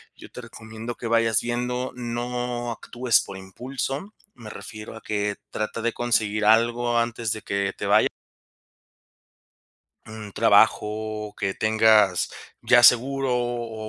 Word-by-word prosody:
yo - - -13
te - - -9
recomiendo 110 +2 -8
que 120 - -9
vayas 115 -1 +2
viendo, 125 +1 -2
no 120 0 -3
actúes 120 +1 0
por 95 - -9
impulso, 135 - -5 0.2
me 115 -3 -11
refiero 110 +1 -9
a - - -12
que 105 -1 -2 0.2
trata 110 +1 -3
de 120 +1 -1
conseguir 110 -3 0
algo 120 +2 +3
antes 115 -1 -2
de 110 - -7
que 100 -1 -2
te - - -4
vaya. - - +4 2.0
Un 110 -2 -9
trabajo 110 0 +2
que 100 -2 -1
tengas 110 -4 +3 0.3
ya 120 0 +5
seguro 130 +2 +4
o 120 -3 -3
115 Hz, 130 wpm, -24 LUFS, 110-120 Hz, 2.0 s, ya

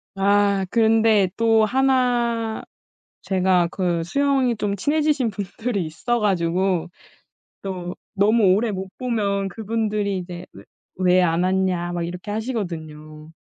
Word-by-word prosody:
아. 200 0 +2
그런데 220 -3 +3
또 225 -1 +4
하나 240 -2 +1 0.6
제가 185 -2 +2
그 175 -3 -1
수영이 265 +4 +1
좀 205 -1 -1
친해지신 295 +2 +1
분들이 200 0 -3
있어 235 +10 -2
가지고 180 -2 0 0.7
또 180 -2 -5 0.2
너무 205 -1 +4
오래 220 +3 +1
못 190 -1 -5
보면 200 -6 -1
그분들이 210 -1 -2
이제 175 0 -7
"왜 - - -13 0.3
왜 185 0 +3
안 165 +1 +1
왔냐?" 185 -2 0
막 175 -1 -2
이렇게 180 +4 -6
하시거든요. 160 -9 -5
200 Hz, 240 characters per minute, -22 LUFS, 180-225 Hz, 0.7 s, 또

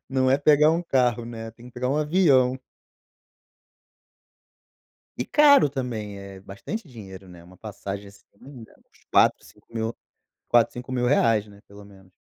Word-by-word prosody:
Não 130 -1 +1
é 135 - +4
pegar 150 +2 +4
um 170 +2 -1
carro, 125 -6 0
né, 115 -1 -8
tem 115 +1 -16
que 125 - -14
pegar 125 +1 -3
um 140 - 0
avião. 145 -5 +2 2.6
E - - -3
caro 285 - +5
também, 115 -7 -5
eh, 100 -1 -11
bastante 100 - -8
dinheiro, 95 -6 -12
né, 85 -1 -14
uma 90 +1 -17
passagem 100 -1 -7
esse 100 0 -17
ano 100 - -20
ainda, 120 -6 -13
uns - - -30
4, - - +3
cinco - - -21
mil 115 0 -3 0.5
4, 120 -1 +3
R$5.000, 120 -3 0
né, 100 -1 -17
pelo 100 0 -14
menos. 95 -2 -19
120 Hz, 155 wpm, -24 LUFS, 100-135 Hz, 2.6 s, caro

